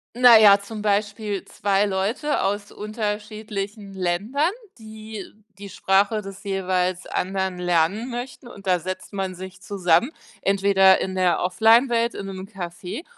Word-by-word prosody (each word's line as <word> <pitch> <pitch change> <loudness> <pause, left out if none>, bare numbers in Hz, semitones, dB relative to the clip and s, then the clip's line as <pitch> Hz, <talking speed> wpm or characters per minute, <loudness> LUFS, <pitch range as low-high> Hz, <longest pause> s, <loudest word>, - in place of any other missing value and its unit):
Naja, 220 -5 +8
zum 215 +1 -8
Beispiel 205 0 -1
2 200 0 0
Leute 215 +10 -1
aus 205 +1 -2
unterschiedlichen 210 -1 -5
Ländern, 205 - 0 0.3
die 220 -2 -9 0.3
die 200 0 -9
Sprache 200 +4 +1
des 195 0 -10
jeweils 185 -2 -1
anderen 190 -1 -2
lernen 180 +7 0
möchten 245 +1 -7
und 200 -5 -12
da 180 -1 +3
setzt 185 +4 -6
man 190 -2 -3
sich 185 +1 -10
zusammen, 195 - +1 0.3
entweder 195 -1 +4
in 190 0 -3
der 180 -3 +2
Offline-Welt 230 +5 +3
in 195 - -6
'nem 190 0 -7
Café 180 - -7
200 Hz, 130 wpm, -23 LUFS, 190-220 Hz, 0.3 s, Naja